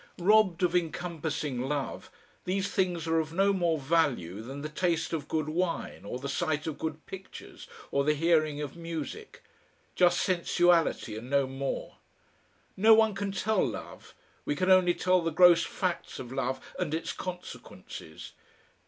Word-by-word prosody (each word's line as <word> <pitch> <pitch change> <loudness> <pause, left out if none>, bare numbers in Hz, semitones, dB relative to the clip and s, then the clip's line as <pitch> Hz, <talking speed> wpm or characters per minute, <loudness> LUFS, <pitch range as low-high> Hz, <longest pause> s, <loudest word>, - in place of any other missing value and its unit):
Robbed 190 -1 +4
of 180 0 +2
encompassing 160 -5 -2
love, 145 -2 -3 0.4
these 195 +2 0
things 180 -4 0
are 165 0 +2
of 160 0 -3
no 195 +3 +3
more 170 -4 +1
value 135 - 0
than 135 +5 -7
the - - -2
taste 165 +1 -1
of 150 -3 -3
good 155 -1 -1
wine 170 - -2
or 115 - -4
the 135 +2 -6
sight 155 +1 -1
of 155 -2 -4
good 155 0 -4
pictures, 190 0 -10 0.2
or 140 - +2
the 150 +1 +2
hearing 155 -2 +2
of 145 - -7
music, 165 -4 -7 0.5
just 175 -1 +4
sensuality 175 - +2
and 115 +3 -8
no 140 0 +3
more. 135 +1 -4 0.8
No 220 +3 +7
one 220 -1 +4
can 200 0 -3
tell 205 +1 +1
love - - -6 0.3
we 145 - -1
can 185 +5 +2
only 180 -2 +5
tell 185 0 +2
the 165 - 0
gross 170 +1 +6
facts 180 -2 -3
of 125 -1 -8
love 130 0 -2 0.2
and 160 -4 -1
its 165 - -3
consequences. 180 - -8
165 Hz, 160 wpm, -29 LUFS, 145-180 Hz, 0.8 s, No